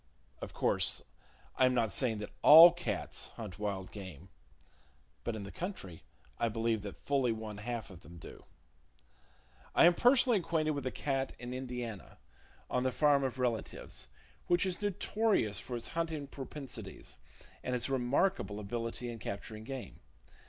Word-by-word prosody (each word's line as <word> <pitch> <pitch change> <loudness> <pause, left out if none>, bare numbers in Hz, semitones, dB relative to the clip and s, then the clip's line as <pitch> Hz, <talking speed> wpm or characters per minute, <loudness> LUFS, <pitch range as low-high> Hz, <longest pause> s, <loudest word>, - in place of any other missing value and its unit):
Of - - -6
course - - +1 0.5
I 130 - +6
am 125 - +1
not 115 -4 +2
saying 120 -2 +1
that 105 0 -6
all 165 +3 +11
cats 175 0 -4
hunt 105 -4 -7
wild 100 -3 -3
game; 95 -4 -9 0.9
but 115 - -2
in 105 - -5
the 100 - -8
country 165 - -6 0.4
I 115 - +2
believe 115 0 0
that 100 -1 -7
fully 135 -4 +1
one 110 -2 -5
half 115 -1 -4
of 90 - -11
them 85 +1 -13
do. - - -11 1.3
I - - +7
am 175 - +7
personally 245 +1 +4
acquainted 160 -3 0
with 140 -3 -3
a - - -1
cat 135 -2 -2
in 120 +1 -6
Indiana, 125 -5 -6 0.5
on 125 - 0
the 130 0 +1
farm 145 +1 +4
of 130 -1 -2
relatives, 120 - -3 0.4
which 175 +2 +3
is 185 +1 -2
notorious 205 - +1
for 125 - -5
its 120 - -4
hunting 165 -3 -2
propensities, 130 - -8 0.4
and 125 - -1
its 120 -1 0
remarkable 135 - +1
ability 115 +3 -4
in 115 -1 -6
capturing 110 +2 -6
game. 130 +1 -7
125 Hz, 155 wpm, -33 LUFS, 105-145 Hz, 1.3 s, all